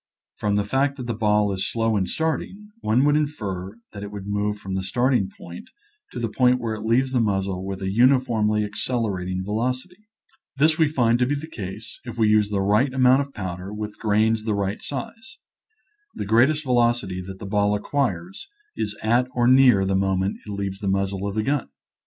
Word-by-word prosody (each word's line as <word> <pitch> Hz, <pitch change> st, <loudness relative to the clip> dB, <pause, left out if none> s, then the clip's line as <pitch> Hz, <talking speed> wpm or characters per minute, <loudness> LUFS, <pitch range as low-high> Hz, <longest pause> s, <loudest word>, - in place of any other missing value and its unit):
From 105 Hz, -1 st, 0 dB
the 105 Hz, -, +2 dB
fact 135 Hz, +6 st, 0 dB
that 125 Hz, -, -6 dB
the 120 Hz, -, -2 dB
ball 105 Hz, -2 st, +2 dB
is 95 Hz, -, -2 dB
slow 115 Hz, -1 st, +1 dB
in 95 Hz, -3 st, 0 dB
starting, 195 Hz, +6 st, -3 dB
one 125 Hz, -, +2 dB
would 145 Hz, 0 st, +4 dB
infer 105 Hz, -10 st, -3 dB
that 100 Hz, -, -8 dB
it 100 Hz, -, -6 dB
would 100 Hz, -2 st, -7 dB
move 105 Hz, +1 st, -1 dB
from 95 Hz, -2 st, -6 dB
the 95 Hz, -, -1 dB
starting 120 Hz, +1 st, +1 dB
point 85 Hz, -2 st, -11 dB, 0.4 s
to -, -, -6 dB
the 115 Hz, -, -1 dB
point 125 Hz, +3 st, +3 dB
where 115 Hz, -2 st, -2 dB
it 110 Hz, -, -6 dB
leaves 120 Hz, +4 st, +1 dB
the 130 Hz, -, +2 dB
muzzle 95 Hz, -3 st, -1 dB
with 95 Hz, 0 st, -5 dB
a 95 Hz, -, -1 dB
uniformly 115 Hz, -3 st, +3 dB
accelerating 100 Hz, -4 st, -2 dB
velocity. 130 Hz, -, -3 dB, 0.5 s
This 155 Hz, +3 st, +3 dB
we 160 Hz, -, +5 dB
find 120 Hz, -5 st, +2 dB
to 125 Hz, -, +2 dB
be 145 Hz, -, 0 dB
the 145 Hz, +2 st, -5 dB
case 110 Hz, -, -8 dB
if 120 Hz, -2 st, -8 dB
we 110 Hz, -2 st, +3 dB
use 105 Hz, -1 st, +3 dB
the 100 Hz, -2 st, 0 dB
right 105 Hz, +7 st, +3 dB
amount 130 Hz, +1 st, +4 dB
of 140 Hz, 0 st, -6 dB
powder, 95 Hz, -3 st, -6 dB
with 105 Hz, 0 st, -6 dB
grains 110 Hz, +1 st, +2 dB
the 110 Hz, -2 st, 0 dB
right 100 Hz, 0 st, -2 dB
size. 225 Hz, -, -7 dB, 0.8 s
The -, -, -4 dB
great 115 Hz, +6 st, +5 dB
est 155 Hz, 0 st, -2 dB
velocity 120 Hz, -7 st, +1 dB
that 95 Hz, -1 st, -7 dB
the 100 Hz, -, -8 dB
ball 105 Hz, +1 st, +1 dB
acquires 145 Hz, -, -2 dB, 0.3 s
is 105 Hz, 0 st, -3 dB
at 120 Hz, +3 st, +2 dB
or 120 Hz, -1 st, +2 dB
near 125 Hz, -6 st, +6 dB
the 95 Hz, 0 st, 0 dB
moment 95 Hz, 0 st, 0 dB
it -, -, -5 dB
leaves 100 Hz, -1 st, -4 dB
the 100 Hz, -, -4 dB
muzzle 95 Hz, 0 st, -1 dB
of 100 Hz, -, -4 dB
the 110 Hz, -, 0 dB
gun. 140 Hz, -, -1 dB
110 Hz, 205 wpm, -23 LUFS, 100-130 Hz, 0.8 s, near